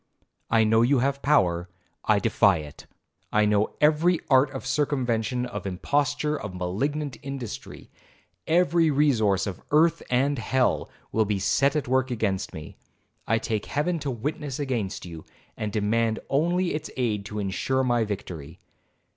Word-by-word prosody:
I 115 -1 +4
know 110 +1 +4
you 130 +4 +4
have 140 +2 0
power,—I 90 - 0
defy 100 -3 +3
it. 75 -2 -10 0.4
I 105 0 +3
know 105 0 +1
every 155 +3 +3
art 130 +1 +5
of - - -7
circumvention, 125 -4 0
of 120 -5 -5
imposture, 145 +10 0
of 100 -10 -6
malignant 135 +11 -2
industry,—every 140 - -2
resource 120 -10 +2
of 100 -4 -5
earth 165 +2 +3
and 135 +2 +1
hell, 130 +2 +1 0.2
will 110 0 +2
be 105 -1 0
set 135 +9 +2
at 150 - -1
work 130 +1 +1
against 105 -6 -1
me. 80 -1 -9 0.5
I 115 - +3
take 110 -1 -3
Heaven 165 +4 -1
to 145 - -3
witness 135 +3 -4
against 120 -11 -3
you, 85 -3 -9 0.3
and 105 -1 -3
demand 110 +1 +1
only 175 +5 +1
its 155 0 -4
aid 110 -5 0
to 105 - -6
insure 105 +7 0
my 120 -2 +2
victory.' 90 -6 -6
120 Hz, 145 wpm, -26 LUFS, 105-145 Hz, 0.5 s, art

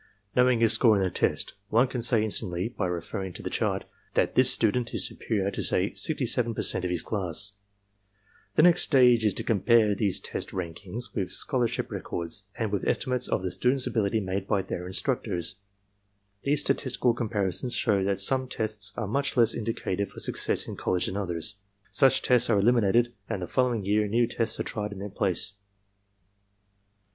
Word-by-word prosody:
Know 125 0 +5
ing 120 -2 +1
his 115 -1 +5
score 110 -2 +5
in 95 - +1
the 95 - 0
test, - - -1 0.2
one 120 +4 +4
can 125 -1 -4
say 115 -2 +2
instantly, 95 -2 0
by 105 -6 -3
reference 90 +1 -4
to - - -10
the - - -4
chart, - - -1 0.3
that - - +2
this 130 0 +5
student 120 +1 +1
is - - +1
superior 100 -3 -2
to - - -4
say 95 +3 +1
67% 120 - 0
of 90 - -1
his 90 -2 -1
class. 100 -1 -1 1.0
"The 155 - +5
next 175 -1 +6
stage 125 -5 +5
is 105 -3 +2
to - - -2
compare 110 0 +3
these 100 -2 0
test - - -4
rankings 95 +6 -6
with 95 -5 -2
scholarship 125 -1 -1
records 85 +3 -4
and 110 -4 -2
with 100 - -2
estimates 125 -2 0
of - - -1
the 95 - -2
students' 125 +6 +1
ability 110 0 0
made 95 0 -3
by 100 -3 +1
their 90 -1 -5
instructors. 100 -2 -1 0.8
These 145 +1 +1
statistical 130 -3 +1
comparisons 110 0 -1
show 100 -2 +1
that 100 0 0
some 130 +6 +1
tests 105 -4 -4
are 115 - -2
much 135 +7 -1
less 115 -2 +4
indicative 105 -3 -3
of - - -5
success - - 0
in - - -6
college 90 - 0
than 95 - -4
others. 95 0 -1 0.3
Such 135 -2 +4
tests 125 -1 +3
are 110 - +4
eliminated 120 +2 +3 0.2
and 100 -5 -3
the - - -4
following 125 -6 0
year 105 +1 +2
new 120 +3 +2
tests 115 -1 -2
are - - 0
tried 105 -1 -4
in - - -9
their 100 +2 -6
place. 95 +1 -1
110 Hz, 180 wpm, -27 LUFS, 95-120 Hz, 1.0 s, next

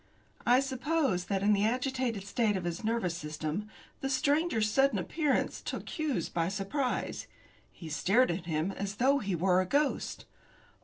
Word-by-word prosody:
I 250 +2 +6
suppose 265 - 0
that 195 -1 -1
in 210 +1 +5
the 200 0 +2
agitated 250 -2 0
state 210 0 +1
of 185 - -4
his 175 +2 -3
nervous 220 -6 0
system, 155 +6 -4 0.3
the 270 - -2
stranger's 280 -3 +2
sudden 270 +1 +3
appearance 275 - 0
took - - -5
Hughes 295 - -1
by 165 -1 -1
surprise. 210 +8 -2 0.4
He 165 - -10
stared 195 +11 +3
at 170 0 -4
him 160 +3 0
as 195 +1 -4
though 270 +5 +3
he 200 -6 -2
were 180 +2 +3
a 185 - -3
ghost. 285 +5 0
210 Hz, 160 wpm, -31 LUFS, 180-265 Hz, 0.4 s, I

